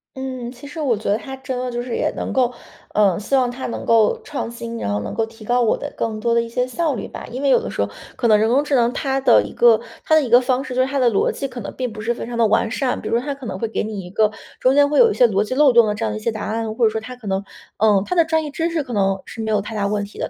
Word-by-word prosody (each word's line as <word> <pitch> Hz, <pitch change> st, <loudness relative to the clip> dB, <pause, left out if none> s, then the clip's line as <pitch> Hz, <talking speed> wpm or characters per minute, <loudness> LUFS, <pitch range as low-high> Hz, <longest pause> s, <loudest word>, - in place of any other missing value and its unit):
嗯， 255 Hz, -2 st, -5 dB
其 255 Hz, +3 st, -12 dB
实 320 Hz, +3 st, -8 dB
我 270 Hz, -6 st, +1 dB
觉 215 Hz, -, -10 dB
得 205 Hz, -, +3 dB
它 265 Hz, +4 st, -8 dB
真 260 Hz, -1 st, -5 dB
的 250 Hz, 0 st, -3 dB
就 240 Hz, -, -3 dB
是 245 Hz, -1 st, -4 dB
也 -, -, 0 dB
能 -, -, -4 dB
够， 250 Hz, -2 st, +1 dB, 0.4 s
呃， 200 Hz, -4 st, +3 dB
希 215 Hz, +7 st, -1 dB
望 250 Hz, -2 st, +3 dB
它 250 Hz, +2 st, -6 dB
能 235 Hz, -, -4 dB
够 230 Hz, -, +3 dB
创 275 Hz, -, -4 dB
新， 235 Hz, 0 st, -6 dB
然 100 Hz, -, -2 dB
后 105 Hz, -, 0 dB
能 105 Hz, -, -5 dB
够 225 Hz, -, +1 dB
提 225 Hz, 0 st, -15 dB
高 245 Hz, +3 st, +1 dB
我 225 Hz, -, +3 dB
的 -, -, -6 dB
更 220 Hz, -1 st, -2 dB
多 235 Hz, +2 st, +1 dB
的 235 Hz, -, +4 dB
一 230 Hz, -, -5 dB
些 250 Hz, +2 st, -1 dB
效 300 Hz, +4 st, -1 dB
率 225 Hz, -, -5 dB
吧。 -, -, -8 dB
因 255 Hz, +3 st, -5 dB
为 280 Hz, -, +2 dB
有 -, -, +5 dB
的 -, -, -5 dB
时 -, -, -2 dB
候 -, -, -3 dB, 0.3 s
可 240 Hz, -, 0 dB
能 215 Hz, -2 st, +6 dB
人 220 Hz, +1 st, +2 dB
工 265 Hz, +5 st, +3 dB
智 290 Hz, -1 st, 0 dB
能， 240 Hz, -1 st, +2 dB
它 270 Hz, -1 st, -1 dB
的 270 Hz, -, +5 dB
一 -, -, -7 dB
个 475 Hz, 0 st, +5 dB, 0.2 s
它 -, -, +1 dB
的 315 Hz, -, +6 dB
一 250 Hz, -, -4 dB
个 240 Hz, +1 st, +7 dB
方 255 Hz, +1 st, 0 dB
式 255 Hz, -3 st, -6 dB
就 255 Hz, -, +3 dB
是 260 Hz, -, -1 dB
它 275 Hz, 0 st, -1 dB
的 245 Hz, -2 st, +4 dB
逻 200 Hz, -, +1 dB
辑 275 Hz, -, -4 dB
可 245 Hz, -2 st, -8 dB
能 -, -, -7 dB
并 255 Hz, -2 st, -3 dB
不 215 Hz, -, -9 dB
是 230 Hz, +2 st, -1 dB
非 235 Hz, -, -7 dB
常 235 Hz, -1 st, -5 dB
地 230 Hz, -, +4 dB
完 220 Hz, +1 st, +2 dB
善， 260 Hz, +2 st, -1 dB
比 -, -, -5 dB
如 230 Hz, -, +2 dB
说 245 Hz, -, -3 dB
它 285 Hz, -, -2 dB
可 270 Hz, -4 st, -9 dB
能 -, -, -4 dB
会 230 Hz, -, -2 dB
给 225 Hz, -, -2 dB
你 210 Hz, -2 st, -4 dB
一 180 Hz, 0 st, -10 dB
个 215 Hz, +1 st, +2 dB, 0.3 s
中 260 Hz, +1 st, +3 dB
间 285 Hz, 0 st, +5 dB
会 295 Hz, -, +1 dB
有 465 Hz, -2 st, +7 dB
一 -, -, -2 dB
些 245 Hz, -, +5 dB
逻 205 Hz, -4 st, +1 dB
辑 235 Hz, +4 st, -4 dB
漏 280 Hz, -2 st, +5 dB
洞 235 Hz, -2 st, +6 dB
的 210 Hz, -, -1 dB
这 225 Hz, +1 st, -2 dB
样 215 Hz, -, -1 dB
的 215 Hz, -, -4 dB
一 -, -, -15 dB
些 230 Hz, -, 0 dB
答 220 Hz, -, -6 dB
案。 220 Hz, 0 st, -3 dB
或 230 Hz, 0 st, +3 dB
者 215 Hz, -, +3 dB
说 220 Hz, 0 st, -3 dB
它 250 Hz, +3 st, -8 dB
可 245 Hz, -3 st, -16 dB
能 195 Hz, 0 st, -1 dB, 0.3 s
嗯， 205 Hz, -2 st, +3 dB
它 360 Hz, -, -2 dB
的 335 Hz, -, +5 dB
专 320 Hz, 0 st, 0 dB
业 300 Hz, -, -6 dB
知 325 Hz, +3 st, -1 dB
识 330 Hz, -3 st, -1 dB
可 250 Hz, -3 st, -7 dB
能 195 Hz, -2 st, +1 dB
是 225 Hz, -, -8 dB
没 220 Hz, -, -3 dB
有 210 Hz, -2 st, +2 dB
太 215 Hz, +2 st, -7 dB
大 200 Hz, -1 st, 0 dB
问 205 Hz, 0 st, -1 dB
题 200 Hz, -, -13 dB
的， -, -, -2 dB
240 Hz, 380 characters per minute, -20 LUFS, 220-265 Hz, 0.4 s, 个